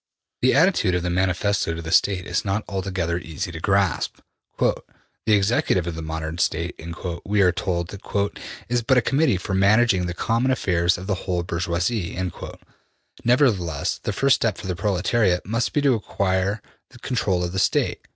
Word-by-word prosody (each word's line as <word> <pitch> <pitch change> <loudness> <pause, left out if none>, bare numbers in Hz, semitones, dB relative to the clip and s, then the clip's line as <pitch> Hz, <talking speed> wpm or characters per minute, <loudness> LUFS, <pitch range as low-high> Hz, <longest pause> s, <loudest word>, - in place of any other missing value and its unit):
'' - - -62
The 130 - +4
attitude 145 - +3
of 90 - -1
the 90 - -1
Manifesto 95 0 0
to 85 - -5
the 80 - -5
State 95 -3 +3
is 90 +4 -1
not 100 +1 -1
altogether 95 -4 -2
easy 90 +3 -5
to 80 - -7
grasp. 95 0 +1 0.4
``The - - +1 0.5
executive 100 -4 +2
of 85 - -3
the 80 - -6
modern 80 +1 -4
State,'' 85 0 -1 0.4
we 105 0 +1
are 90 - +5
told, 85 -1 -2
``is 100 +4 -3
but 130 -2 +5
a - - +5
Committee 135 -3 +2
for 95 +1 -5
managing 100 -1 +3
the 85 - -4
common 115 +6 0
affairs 90 -8 +1
of 90 - -8
the 100 - 0 0.2
whole 90 -1 0
bourgeoisie.'' 85 +3 -2 1.1
Nevertheless, 105 - +1
the - - -2
first 135 -1 +3
step 110 -4 0
for - - -9
the 90 -1 -2
proletariat 95 0 +1
must 115 +4 -1
be 145 - +1
to 140 -2 +4
acquire 100 -2 -1 0.4
control 100 -8 0
of 90 - -2
the 95 - -2
State. - - +1
95 Hz, 170 wpm, -23 LUFS, 85-110 Hz, 1.1 s, are